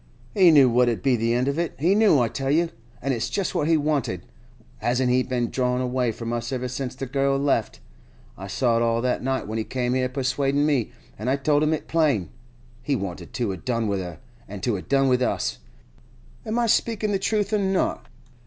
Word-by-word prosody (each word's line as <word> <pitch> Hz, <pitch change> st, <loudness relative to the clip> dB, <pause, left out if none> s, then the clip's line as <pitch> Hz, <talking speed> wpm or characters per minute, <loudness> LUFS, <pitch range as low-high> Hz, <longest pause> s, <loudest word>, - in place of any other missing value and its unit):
He 185 Hz, -3 st, +6 dB
knew 145 Hz, -5 st, +7 dB
what 125 Hz, 0 st, +3 dB
'ud 115 Hz, -, -3 dB
be 135 Hz, -2 st, +3 dB
the 115 Hz, +1 st, 0 dB
end 125 Hz, +2 st, +1 dB
of 140 Hz, +3 st, -1 dB
it—he 170 Hz, +1 st, +1 dB
knew, 210 Hz, -8 st, +5 dB
I 120 Hz, -, +2 dB
tell 135 Hz, +3 st, -3 dB
you,—an' 140 Hz, -5 st, -2 dB
it's 120 Hz, -2 st, -1 dB
just 195 Hz, -3 st, -2 dB
what 150 Hz, -, 0 dB
he 165 Hz, -1 st, +4 dB
wanted. 145 Hz, -, -1 dB, 0.5 s
Hasn't 125 Hz, +1 st, +1 dB
he 130 Hz, +1 st, +3 dB
been 125 Hz, -2 st, -2 dB
drawin' 125 Hz, -1 st, 0 dB
away 125 Hz, -1 st, 0 dB
from 115 Hz, +1 st, -5 dB
us 120 Hz, +2 st, -3 dB
ever 125 Hz, -1 st, -2 dB
since 125 Hz, 0 st, -4 dB
the 135 Hz, -, -5 dB
girl 135 Hz, +1 st, +1 dB
left? 140 Hz, 0 st, 0 dB, 0.5 s
I 95 Hz, -, -8 dB
saw 115 Hz, +4 st, +1 dB
it -, -, +1 dB
all 115 Hz, 0 st, +1 dB
that 125 Hz, -1 st, 0 dB
night 130 Hz, -2 st, -2 dB
when 110 Hz, +1 st, -3 dB
he -, -, -1 dB
came 125 Hz, +1 st, -2 dB
here 130 Hz, 0 st, 0 dB
persuadin' 135 Hz, +2 st, 0 dB
me, 140 Hz, -7 st, +1 dB, 0.3 s
an' 110 Hz, -, -4 dB
I 130 Hz, -, +3 dB
told 145 Hz, +1 st, +1 dB
it 155 Hz, -, +2 dB
him 155 Hz, -1 st, +1 dB
plain. 150 Hz, -, +1 dB, 0.5 s
He 140 Hz, +3 st, 0 dB
wanted 90 Hz, -5 st, -5 dB
to 120 Hz, -5 st, -1 dB
'a 95 Hz, -, -5 dB
done 115 Hz, +5 st, -2 dB
with 100 Hz, -1 st, -1 dB
her, 90 Hz, -3 st, -6 dB, 0.3 s
and 100 Hz, -1 st, -8 dB
to 120 Hz, -4 st, +1 dB
a' 95 Hz, -, -4 dB
done 135 Hz, +4 st, +2 dB
with 125 Hz, -1 st, +2 dB
us. 125 Hz, -, -1 dB, 0.9 s
Am 220 Hz, +2 st, -1 dB
I 240 Hz, -, +2 dB
speakin' 220 Hz, -1 st, +1 dB
the 195 Hz, -, 0 dB
truth 205 Hz, +1 st, 0 dB
or 210 Hz, -, +3 dB
not? 190 Hz, -1 st, 0 dB
130 Hz, 220 wpm, -24 LUFS, 120-145 Hz, 0.9 s, knew